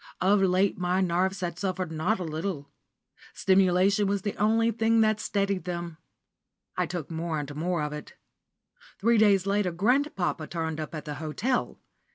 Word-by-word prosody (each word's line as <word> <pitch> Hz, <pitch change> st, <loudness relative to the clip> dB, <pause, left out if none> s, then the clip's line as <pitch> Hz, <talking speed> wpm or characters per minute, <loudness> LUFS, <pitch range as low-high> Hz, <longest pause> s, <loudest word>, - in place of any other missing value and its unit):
Of 195 Hz, +2 st, +3 dB
late 190 Hz, +1 st, +2 dB
my 180 Hz, +1 st, +1 dB
nerves 185 Hz, +1 st, 0 dB
had 175 Hz, -1 st, -3 dB
suffered 185 Hz, -3 st, -2 dB
not 160 Hz, +8 st, 0 dB
a -, -, -3 dB
little. 160 Hz, -2 st, -4 dB, 0.6 s
Stimulant 190 Hz, +1 st, +3 dB
was 200 Hz, -1 st, -1 dB
the 205 Hz, -, -2 dB
only 225 Hz, +2 st, +3 dB
thing 225 Hz, 0 st, +2 dB
that 215 Hz, -1 st, +2 dB
steadied 200 Hz, -3 st, -1 dB
them. 170 Hz, -2 st, -5 dB, 0.8 s
I -, -, 0 dB
took 175 Hz, -3 st, -5 dB
more 165 Hz, 0 st, -2 dB
and 145 Hz, -1 st, -5 dB
more 170 Hz, +1 st, -1 dB
of 150 Hz, 0 st, -3 dB
it. 150 Hz, -, -9 dB, 0.8 s
Three 230 Hz, +2 st, +3 dB
days 200 Hz, -3 st, +4 dB
later 200 Hz, -2 st, +1 dB
grandpapa 195 Hz, -, 0 dB
turned 160 Hz, -2 st, -3 dB
up 155 Hz, +1 st, -5 dB
at 155 Hz, -, -6 dB
the 150 Hz, -, -4 dB
hotel. 215 Hz, +12 st, -1 dB
185 Hz, 165 wpm, -27 LUFS, 165-200 Hz, 0.8 s, days